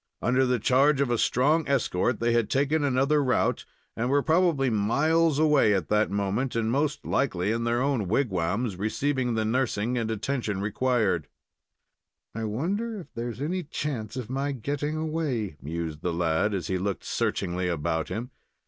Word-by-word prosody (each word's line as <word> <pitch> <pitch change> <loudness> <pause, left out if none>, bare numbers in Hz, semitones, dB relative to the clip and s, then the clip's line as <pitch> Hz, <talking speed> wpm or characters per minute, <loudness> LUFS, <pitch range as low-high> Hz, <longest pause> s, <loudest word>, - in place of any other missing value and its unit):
Under 125 +2 +2
the 125 0 +2
charge 135 +5 +3
of 140 -3 +1
a 120 - +2
strong 150 +6 +2
escort 120 -4 +1
they 115 0 +1
had 120 -3 +1
taken 145 +3 +1
another 140 +2 +2
route, 130 - +1 0.3
and 120 +2 -1
were 140 +1 +3
probably 160 -4 +2
miles 150 +9 +2
away 150 -9 +4
at 95 -5 -2
that 105 0 +2
moment, 100 +6 -1
and 115 -1 0
most 145 +3 -1
likely 105 -7 0
in 115 +1 -1
their 120 +2 +1
own 135 -8 0
wigwams, 100 -1 0
receiving 125 +4 -1
the 110 -1 0
nursing 120 0 0
and 115 -1 -2
attention 110 -2 -2
required. 105 - 0 1.1
"I 115 +1 -3
wonder 195 - -2
whether 185 - -9
there 120 +1 -4
is 120 +4 -6
any 180 +5 -1
chance 135 - -4
of 125 -4 -4
my 135 +3 -2
getting 145 +5 -3
away?" 150 - -2
mused 80 0 -5
the 90 - -1
lad, 85 +5 +1
as 90 -4 -3
he 95 -1 -1
looked 100 +1 -2
searchingly 90 +1 -1
about 80 -1 -1
him. 120 +4 -4
120 Hz, 170 wpm, -27 LUFS, 105-140 Hz, 1.1 s, away